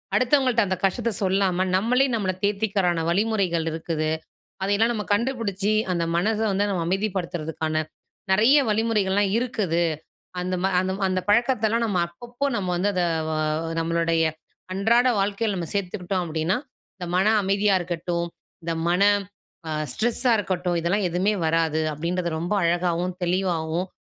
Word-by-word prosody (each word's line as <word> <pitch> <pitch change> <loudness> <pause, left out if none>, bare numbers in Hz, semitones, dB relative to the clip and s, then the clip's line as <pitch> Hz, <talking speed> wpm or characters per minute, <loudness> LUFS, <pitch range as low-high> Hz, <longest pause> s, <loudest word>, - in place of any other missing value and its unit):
அடுத்தவங்கள்ட்ட 255 -2 +3
அந்த 185 0 -1
கஷ்டத்த 230 +4 +1
சொல்லாம, 190 -1 +1
நம்மளே, 245 +7 +3
நம்மள 200 -4 0
தேத்திக்கிறதுக்கான 195 -4 +1
வழிமுறைகள் 190 -3 +1
இருக்குது. 160 -1 -2 0.5
அத - - -1
எல்லாம் 225 +3 +2
நம்ம 210 -2 -3
கண்டுபிடிச்சு, 210 -4 -1 0.2
அந்த 170 -1 0
மனச 210 +5 +1
வந்து 200 +1 +1
நம்ம 180 -3 -1
அமைதிப்படுத்துறதுக்கான 175 -5 -2 0.6
நிறைய 225 +9 +5
வழிமுறைகள்லாம் 205 -3 +1
இருக்குது. 210 -9 0 0.6
அந்த, 185 +1 -2
ம - - +3
அந்த, 185 +1 -1
அந்த 185 0 0
பழக்கத்தெல்லாம் 230 0 +2
நம்ம 200 -5 0
அப்பப்போ 240 +10 -4
நம்ம 190 -3 -2
வந்து 195 +4 +1
அத 180 - +2 0.3
வ - - -1 0.5
நம்மளுடைய 165 0 +1 0.5
அன்றாட 230 +6 +3
வாழ்க்கையில 205 +1 0
நம்ம 170 -2 -4
சேர்த்துக்கிட்டோம் 185 -1 -2
அப்பிடின்னா, 160 +4 0 0.4
இந்த 180 - -5
மனம் 210 +4 +4
அமைதியா 200 +1 +2
இருக்கட்டும், 170 0 -3 0.4
இந்த 165 0 -2 0.2
மன 180 +2 +2 0.7
ஆ - - -3 0.2
ஸ்ட்ரெஸ்ஸா 240 +2 +2
இருக்கட்டும். 180 -3 -1
இதெல்லாம் 180 +4 +1
எதுமே 185 +5 +1
வராது. 160 -1 +1
அப்பிடின்றத 170 +3 -2
ரொம்ப 175 +5 -2
அழகாவும், 175 +1 0
தெளிவாவும் 175 -1 -1
190 Hz, 135 wpm, -24 LUFS, 175-215 Hz, 0.7 s, நிறைய